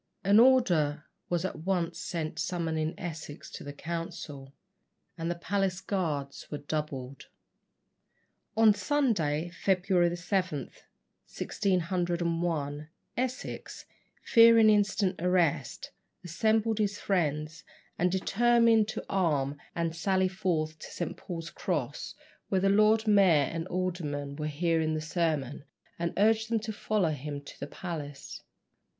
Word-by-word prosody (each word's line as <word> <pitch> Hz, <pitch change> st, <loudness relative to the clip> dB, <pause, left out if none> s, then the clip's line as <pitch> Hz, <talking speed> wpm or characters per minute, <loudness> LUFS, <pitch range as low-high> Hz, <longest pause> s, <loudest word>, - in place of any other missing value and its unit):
An 200 Hz, +3 st, +6 dB
order 175 Hz, -, +4 dB, 0.2 s
was 175 Hz, 0 st, 0 dB
at 190 Hz, -, -4 dB
once 175 Hz, 0 st, -1 dB
sent 165 Hz, -2 st, -4 dB
summoning 165 Hz, -2 st, -1 dB
Essex 160 Hz, -3 st, -7 dB
to -, -, -8 dB
the 145 Hz, -, -6 dB
council, 145 Hz, -3 st, -6 dB, 0.6 s
and 165 Hz, 0 st, -3 dB
the 175 Hz, -, -1 dB
palace 190 Hz, +1 st, -1 dB
guards 160 Hz, -8 st, -3 dB
were 150 Hz, -, -4 dB
doubled. 140 Hz, -3 st, -5 dB, 1.3 s
On 220 Hz, -1 st, +7 dB
Sunday, 190 Hz, -, 0 dB
February 180 Hz, -1 st, +2 dB
7, 180 Hz, -2 st, -1 dB, 0.7 s
1601, 170 Hz, -5 st, -1 dB, 0.3 s
Essex, 255 Hz, +1 st, -4 dB, 0.4 s
fearing 230 Hz, -2 st, +7 dB
instant 200 Hz, -3 st, +1 dB
arrest, 180 Hz, -4 st, 0 dB, 0.3 s
assembled 220 Hz, +5 st, +1 dB
his 205 Hz, -1 st, 0 dB
friends, 160 Hz, -3 st, -1 dB, 0.4 s
and 180 Hz, 0 st, +2 dB
determined 230 Hz, +3 st, +3 dB
to 220 Hz, -, -5 dB
arm 150 Hz, -7 st, +1 dB, 0.2 s
and 165 Hz, -1 st, -1 dB
sally 190 Hz, +2 st, +2 dB
forth 165 Hz, -4 st, -2 dB
to -, -, -8 dB
St. 175 Hz, -, -4 dB
Paul's 170 Hz, -1 st, -7 dB
Cross, 145 Hz, -6 st, -3 dB, 0.3 s
where 190 Hz, -1 st, +1 dB
the 195 Hz, -, +3 dB
Lord 215 Hz, +2 st, +4 dB
Mayor 185 Hz, -9 st, +5 dB
and 165 Hz, +1 st, -3 dB
aldermen 160 Hz, -7 st, -3 dB
were 150 Hz, 0 st, -3 dB
hearing 160 Hz, +1 st, 0 dB
the -, -, -1 dB
sermon, 155 Hz, -5 st, -1 dB, 0.4 s
and 170 Hz, 0 st, -1 dB
urge 220 Hz, +2 st, +3 dB
them 230 Hz, -1 st, +1 dB
to 220 Hz, 0 st, -4 dB
follow 205 Hz, -5 st, 0 dB
him 145 Hz, 0 st, -5 dB
to 145 Hz, -, -13 dB
the 140 Hz, -, -5 dB
palace. 145 Hz, -5 st, -7 dB
175 Hz, 120 wpm, -29 LUFS, 155-195 Hz, 1.3 s, On